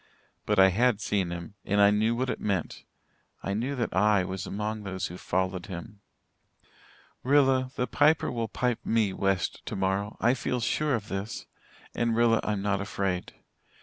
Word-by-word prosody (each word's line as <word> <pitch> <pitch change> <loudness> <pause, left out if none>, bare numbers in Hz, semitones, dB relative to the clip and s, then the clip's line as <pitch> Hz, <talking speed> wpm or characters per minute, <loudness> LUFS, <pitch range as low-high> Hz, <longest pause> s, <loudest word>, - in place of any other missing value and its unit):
But 105 - +2
I 95 0 +7
had 115 +3 +2
seen 100 -4 0
him 85 +2 -6
and 100 +1 0
I 100 0 +7
knew 110 +3 +2
what 125 +1 -1
it - - -4
meant 95 -6 -2 0.6
I 95 - -2
knew 125 +7 -2
that 120 -6 -2
I 105 0 +4
was 95 +1 -5
among 105 +1 -3
those 95 -2 -4
who 90 - -6
followed 95 0 -1
him. 100 +3 -8 1.2
"Rilla, 130 -1 +3
the 125 - 0
Piper 150 +3 +3
will 115 -2 -2
pipe 125 +2 -1
me 110 -4 +1
'west' 95 -2 -1
tomorrow. 95 +2 -2
I 120 +2 +4
feel 125 0 -2
sure 145 +4 +1
of 105 -2 -5
this. 95 +3 -4 0.5
And 115 -1 0
Rilla, 115 -1 +4
I'm 105 -2 -1
not 100 -1 0
afraid. 95 -2 -2
105 Hz, 170 wpm, -28 LUFS, 95-120 Hz, 1.2 s, I